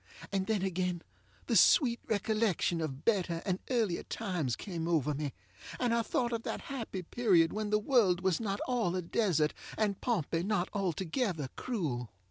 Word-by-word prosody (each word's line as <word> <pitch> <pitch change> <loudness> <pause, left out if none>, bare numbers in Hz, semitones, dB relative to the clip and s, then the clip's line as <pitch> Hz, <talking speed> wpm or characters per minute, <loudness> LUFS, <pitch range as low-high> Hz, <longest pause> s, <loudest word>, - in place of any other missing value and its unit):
And 190 -1 0
then 210 -4 +1
again 180 -2 -1 0.4
the - - 0
sweet 240 -7 +5
recollection 210 -5 +1
of 140 -3 -4
better 180 -6 +1
and 185 -1 0
earlier 225 -9 +1
times 175 - -2
came 170 - -4
over 150 -4 +2
me, 145 0 -3 0.5
and 245 -2 +2
I 235 - +3
thought 240 +2 -1
of 230 - -1
that - - -4
happy 230 -9 -5
period 175 -5 +3
when 215 0 -2
the 210 - +4
world 210 -6 +3
was 185 -3 +1
not 200 -3 -2
all 230 -8 0
a 185 - -1
desert, 165 -5 +1 0.2
and 205 -3 0
Pompey 170 - 0
not 190 -1 0
altogether 185 - -1
cruel. 145 - -3
190 Hz, 165 wpm, -32 LUFS, 170-225 Hz, 0.5 s, sweet